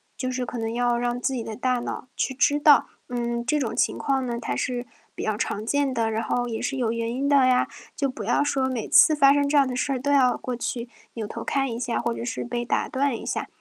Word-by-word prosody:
就 255 Hz, -1 st, -3 dB
是 255 Hz, 0 st, -2 dB
可 240 Hz, 0 st, -5 dB
能 225 Hz, 0 st, -2 dB
要 240 Hz, 0 st, +1 dB
让 245 Hz, 0 st, -1 dB
自 265 Hz, -, -1 dB
己 245 Hz, -3 st, -3 dB
的 220 Hz, -, -6 dB
大 250 Hz, +1 st, 0 dB
脑 250 Hz, +1 st, -5 dB
去 -, -, -1 dB
知 290 Hz, +2 st, +3 dB
道， 290 Hz, -3 st, +6 dB, 0.2 s
嗯， 235 Hz, -1 st, -2 dB
这 300 Hz, +5 st, +1 dB
种 230 Hz, -5 st, -2 dB
情 -, -, +1 dB
况 270 Hz, -2 st, 0 dB
呢 235 Hz, -1 st, -2 dB
它 125 Hz, -, -3 dB
是 245 Hz, -, -2 dB, 0.3 s
比 -, -, -5 dB
较 215 Hz, -, 0 dB
常 210 Hz, 0 st, -3 dB
见 285 Hz, +3 st, +1 dB
的。 225 Hz, -1 st, 0 dB
然 220 Hz, +1 st, -1 dB
后 245 Hz, +1 st, -1 dB
也 225 Hz, -2 st, -4 dB
是 275 Hz, -, -2 dB
有 235 Hz, -3 st, 0 dB
原 230 Hz, 0 st, -2 dB
因 265 Hz, +4 st, -1 dB
的 280 Hz, -2 st, +5 dB
呀， 250 Hz, 0 st, +3 dB, 0.3 s
就 280 Hz, -, 0 dB
不 240 Hz, -5 st, -6 dB
要 240 Hz, +5 st, +2 dB
说 270 Hz, -2 st, 0 dB
每 245 Hz, -4 st, -3 dB
次 310 Hz, -, +6 dB
发 275 Hz, -2 st, +6 dB
生 285 Hz, 0 st, +1 dB
这 295 Hz, -, +3 dB
样 275 Hz, -2 st, +5 dB
的 250 Hz, -, -3 dB
事 275 Hz, +2 st, 0 dB
儿 255 Hz, -, -2 dB
都 285 Hz, +2 st, -1 dB
要 260 Hz, -3 st, +4 dB
过 250 Hz, -, -4 dB
去 240 Hz, 0 st, -4 dB, 0.3 s
扭 225 Hz, -2 st, -3 dB
头 230 Hz, +2 st, -6 dB
看 270 Hz, +2 st, 0 dB
一 230 Hz, -, -5 dB
下， 240 Hz, -1 st, -1 dB
或 235 Hz, 0 st, -1 dB
者 -, -, -6 dB
是 245 Hz, +1 st, -3 dB
被 240 Hz, 0 st, -3 dB
打 240 Hz, -, 0 dB
断 270 Hz, -3 st, 0 dB
一 -, -, -9 dB
下， -, -, -2 dB
245 Hz, 290 characters per minute, -25 LUFS, 235-275 Hz, 0.3 s, 道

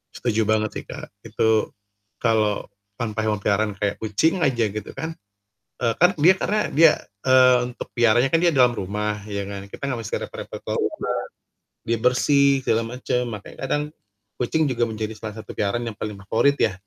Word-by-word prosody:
Setuju 115 Hz, -2 st, 0 dB
banget 110 Hz, 0 st, +1 dB
sih, -, -, -5 dB
Kak, -, -, -8 dB, 0.2 s
itu 110 Hz, 0 st, +1 dB, 0.5 s
kalau 110 Hz, -3 st, +1 dB, 0.3 s
tanpa 110 Hz, -2 st, -2 dB
hewan 105 Hz, -2 st, 0 dB
peliharaan 105 Hz, +2 st, +1 dB
kayak 105 Hz, -1 st, 0 dB
kucing 160 Hz, -, +1 dB
aja 120 Hz, -6 st, +2 dB
gitu 105 Hz, +1 st, -6 dB
kan, 160 Hz, 0 st, -5 dB, 0.7 s
eee, 115 Hz, -2 st, +2 dB
kan 180 Hz, +1 st, +7 dB
dia 170 Hz, +5 st, +6 dB
karena 215 Hz, -, 0 dB
dia, 160 Hz, +1 st, +7 dB, 0.3 s
eee, 130 Hz, -1 st, +6 dB
untuk 125 Hz, -, -8 dB
peliharanya 120 Hz, +2 st, +3 dB
kan 165 Hz, -, +4 dB
dia 170 Hz, -2 st, +4 dB
dalam 125 Hz, -2 st, +5 dB
rumah 105 Hz, 0 st, -3 dB
ya 100 Hz, -1 st, -3 dB
kan, 100 Hz, -1 st, -7 dB
kita -, -, -11 dB
enggak 125 Hz, -, -2 dB
mesti -, -, -4 dB
repot-repot -, -, -8 dB
ke -, -, -12 dB
luar -, -, -1 dB
rumah, -, -, -2 dB, 0.9 s
dia 115 Hz, 0 st, +1 dB
bersih, 140 Hz, +2 st, +3 dB
segala 115 Hz, +1 st, +2 dB
macam, 125 Hz, -1 st, -1 dB
makanya 105 Hz, -, -10 dB
kadang 145 Hz, +2 st, 0 dB, 0.6 s
kucing 155 Hz, +6 st, 0 dB
juga 120 Hz, -2 st, +1 dB
menjadi 110 Hz, 0 st, -4 dB
salah 105 Hz, -1 st, -6 dB
satu -, -, -14 dB
peliharaan 110 Hz, +4 st, -1 dB
yang 105 Hz, -, -11 dB
paling 105 Hz, -1 st, -4 dB
favorit 140 Hz, +8 st, +2 dB
ya, -, -, +2 dB
115 Hz, 180 wpm, -23 LUFS, 105-130 Hz, 0.9 s, kan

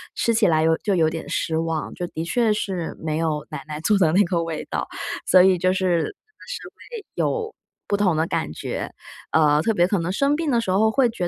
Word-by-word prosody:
吃 230 Hz, -, +1 dB
起 225 Hz, -1 st, +3 dB
来 160 Hz, -2 st, +3 dB
有 160 Hz, 0 st, +3 dB
就 205 Hz, -, 0 dB
有 160 Hz, -3 st, +3 dB
点 160 Hz, 0 st, -6 dB
失 160 Hz, -1 st, -1 dB
望， 165 Hz, -1 st, -2 dB
就 175 Hz, -, -3 dB
的 160 Hz, -, -5 dB
确 225 Hz, +4 st, +2 dB
是 185 Hz, -5 st, -3 dB
没 155 Hz, -1 st, -2 dB
有 155 Hz, -2 st, -1 dB
奶 -, -, -6 dB
奶 150 Hz, -1 st, -5 dB
做 210 Hz, +5 st, +3 dB
的 170 Hz, -5 st, +3 dB
那 200 Hz, +3 st, +5 dB
个 170 Hz, -1 st, 0 dB
味 165 Hz, -1 st, -4 dB
道， -, -, -2 dB, 0.4 s
所 185 Hz, -, +6 dB
以 190 Hz, -1 st, +5 dB
就 185 Hz, +1 st, +2 dB
是 185 Hz, -2 st, +1 dB
真 -, -, -4 dB
的 -, -, -23 dB, 0.3 s
是 -, -, -5 dB
会 460 Hz, -4 st, -11 dB
有 450 Hz, -2 st, -1 dB, 0.3 s
不 205 Hz, -, +1 dB
同 190 Hz, -5 st, +2 dB
的 160 Hz, +1 st, +1 dB
感 75 Hz, -, -2 dB
觉。 -, -, -5 dB, 0.4 s
呃， 150 Hz, -1 st, +4 dB
特 225 Hz, -, +2 dB
别 175 Hz, -3 st, +3 dB
可 200 Hz, -, +1 dB
能 170 Hz, +2 st, -2 dB
生 275 Hz, +9 st, +2 dB
病 315 Hz, -1 st, -1 dB
的 235 Hz, -2 st, +2 dB
时 230 Hz, -, -4 dB
候 215 Hz, +4 st, +3 dB
会 250 Hz, +1 st, +3 dB
觉 195 Hz, -6 st, -3 dB
180 Hz, 260 characters per minute, -23 LUFS, 160-220 Hz, 0.4 s, 所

